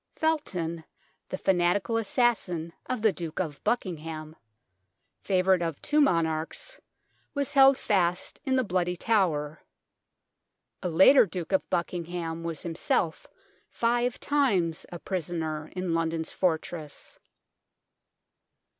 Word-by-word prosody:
Felton, 180 - -1 0.5
the 185 - -3
fanatical 190 +4 +1
assassin 200 -8 0
of 250 -4 -3
the 220 -3 +4
Duke 165 -3 -5
of 155 -6 -4
Buckingham, 160 -8 -3 0.8
favourite 185 -1 +2
of 165 -4 -2
two 300 0 +2
monarchs, 165 - 0 0.6
was 280 -2 -1
held 270 -1 +7
fast 180 -3 0
in 265 -3 +1
the 260 - +3
Bloody 180 -3 0
Tower. 165 -8 0 1.2
A 180 - -2
later 195 - +7
Duke 170 0 -5
of 190 - +1
Buckingham 170 -2 -3
was 165 -3 -5
himself 165 -1 -1 0.4
five 240 +1 0
times 200 - +1
a 175 - -5
prisoner 160 -3 -3
in 180 -2 -2
London's 165 -1 -1
fortress. 160 -3 -3
175 Hz, 110 wpm, -28 LUFS, 165-220 Hz, 1.2 s, held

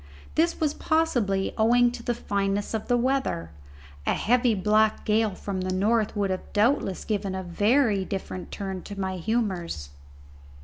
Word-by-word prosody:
This 335 +2 +1
was 300 -2 +1
possibly 240 -12 +1
owing 240 +2 +5
to 240 - -7
the 240 0 -1
fineness 200 -2 -1
of 220 -1 -3
the 245 - +3
weather; 250 - 0 0.6
a - - +3
heavy 245 0 +2
black 215 +2 +2
gale 215 -2 +2
from 190 -1 -4
the 185 0 -2
north 210 +4 +1
would 200 -2 +1 0.2
doubtless 210 -3 +2
have - - -18
given 200 -3 -1
a 190 - -3
very 205 +3 +2
different 185 -1 -5
turn 190 -2 -4
to 200 +1 -8
my 190 -1 -2
humours. 180 - -2
210 Hz, 160 wpm, -26 LUFS, 190-240 Hz, 0.6 s, owing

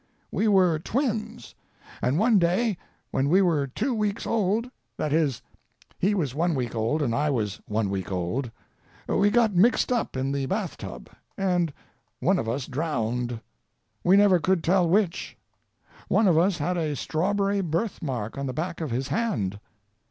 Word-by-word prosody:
"We 220 - +1
were 185 -6 +4
twins, 220 - -3 0.5
and 130 +4 +1
one 220 +1 +4
day 185 +6 +2 0.4
when 135 +2 +1
we 185 +5 +5
were 155 -6 +1
two 230 - -2
weeks 210 -2 -1
old—that 220 - -2
is, 150 -6 +1 0.6
he 205 +3 +2
was 150 -10 -1
one 165 +3 +1
week 125 -3 -2
old, 115 +7 0
and 120 -5 0
I 150 +5 +1
was 110 -8 -2
one 105 0 0
week 95 -1 -3
old—we 115 - -2
got 225 -1 +3
mixed 220 +8 +3
up 235 - -1
in 135 +1 -1
the 140 -1 -1
bath 195 +1 -2
tub, - - -8 0.3
and 180 -4 +1 0.5
one 185 +2 +2
of 110 - -2
us 125 +3 -2
drowned. 125 -5 -2 0.6
We 185 +3 +5
never 200 -3 +5
could 185 0 +1
tell 180 -1 +3
which. 190 -1 0 0.7
One 215 - +3
of 175 - +4
us 175 +3 +3
had 180 +4 -1
a 155 -3 -1
strawberry 200 +7 0
birthmark 150 - -3
on 140 - -2
the 130 - -3
back 170 +3 -4
of 155 - -2
his 130 +3 -2
hand. 105 - -1
170 Hz, 160 wpm, -26 LUFS, 135-200 Hz, 0.7 s, we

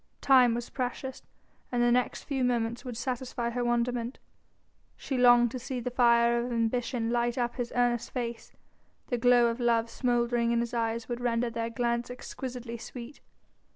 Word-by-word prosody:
Time 255 -4 +5
was 240 0 -4
precious, 260 +1 -4 0.5
and 240 -1 +1
the 240 - +4
next 250 0 +1
few 270 -3 -2
moments 235 -1 0
would 245 -3 -6
satisfy 245 -1 -3
her 245 +1 -2
wonderment. 240 +1 -1 0.8
She 270 - -4
longed 245 -2 +6
to 255 - -5
see 255 +1 -4
the 245 +1 -4
fire 235 -1 +4
of 245 - -4
ambition 230 0 -1
light 240 0 0
up 240 -1 -1
his 245 -2 -3
earnest 240 -1 +1
face: 235 -2 -5 0.6
the 245 - -1
glow 245 0 +5
of 235 +1 0
love 230 -1 +1
smouldering 240 -1 +1
in 235 - +2
his 235 0 -2
eyes 230 0 -1
would 240 0 -4
render 235 0 0
their 230 0 -3
glance 235 0 -1
exquisitely 245 -1 -7
sweet. 245 +4 -9
240 Hz, 170 wpm, -29 LUFS, 235-250 Hz, 0.8 s, longed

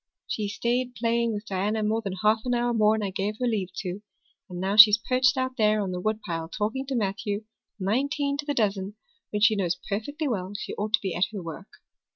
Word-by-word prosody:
"She 210 -2 -2
stayed 245 +4 -1
playing 230 0 +1
with 210 0 -5
Diana 210 +3 -1
more 220 +2 +1
than 195 -4 -4
half 215 +1 +4
an 245 -1 0
hour 240 0 +1
more 215 -1 +4
'n 220 - -2
I 195 - -2
gave 200 +3 -2
her 250 - 0
leave 205 -6 -1
to; 185 +1 -5 0.5
and 180 -1 -6
now 190 +2 0
she's 215 -1 +10
perched 255 +3 +2
out 260 0 -2
there 215 -1 +3
on 195 -3 -2
the 180 0 -4
woodpile 180 -6 -3
talking 220 +8 -2
to 270 - -2
Matthew, 205 -1 -2 0.4
nineteen 280 +8 0
to 290 - -4
the 290 - -1
dozen, 200 -2 0 0.3
when 210 - -2
she 215 0 +6
knows 180 -3 0
perfectly 285 +10 -3
well 195 -6 -2
she - - -5
ought 210 +1 -4
to 215 - +4
be 190 -3 -2
at 175 - +2
her 200 -4 -6
work. 165 +4 -8
215 Hz, 220 wpm, -26 LUFS, 195-235 Hz, 0.5 s, she's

